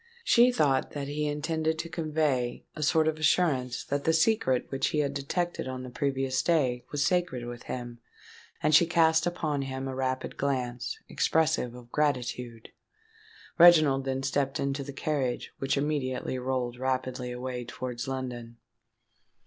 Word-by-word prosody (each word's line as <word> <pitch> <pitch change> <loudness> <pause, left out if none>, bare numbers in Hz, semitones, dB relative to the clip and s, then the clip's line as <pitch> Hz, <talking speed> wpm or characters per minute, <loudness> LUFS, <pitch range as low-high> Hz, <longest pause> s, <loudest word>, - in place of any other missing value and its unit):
She 245 - +5
thought 145 - +1
that 140 -1 -4
he 150 +1 -2
intended 160 +2 -1
to 165 - -4
convey 155 -6 -1
a 155 - -6
sort 155 +1 +3
of 155 0 -1
assurance 145 -6 +1
that 140 0 -2
the 160 - +2
secret 160 - +2
which 135 - 0
he - - -2
had 140 -2 +1
detected 160 +4 -2
on 130 -1 -5
the 125 - -8
previous 135 0 0
day, 130 -8 +1
was 145 -1 0
sacred 175 -10 0
with 120 0 -7
him; 120 -1 -5 0.6
and 155 - +3
she 165 +3 +7
cast 160 -1 +3
upon 155 -5 -1
him 135 0 -4
a 135 - -4
rapid 130 0 -2
glance, 125 -3 -2
expressive 160 -6 +1
of 120 -1 -13
gratitude. 125 -5 -2 0.9
Reginald 155 -6 +7
then 135 0 -2
stepped 135 0 0
into 140 0 -1
the 140 - -7
carriage, 135 -3 -2
which 135 +1 0
immediately 140 -3 -1
rolled 125 -1 -2
rapidly 130 -1 -2
away 125 0 -4
towards 125 0 -5
London. 125 -3 -5
135 Hz, 155 wpm, -28 LUFS, 125-155 Hz, 0.9 s, she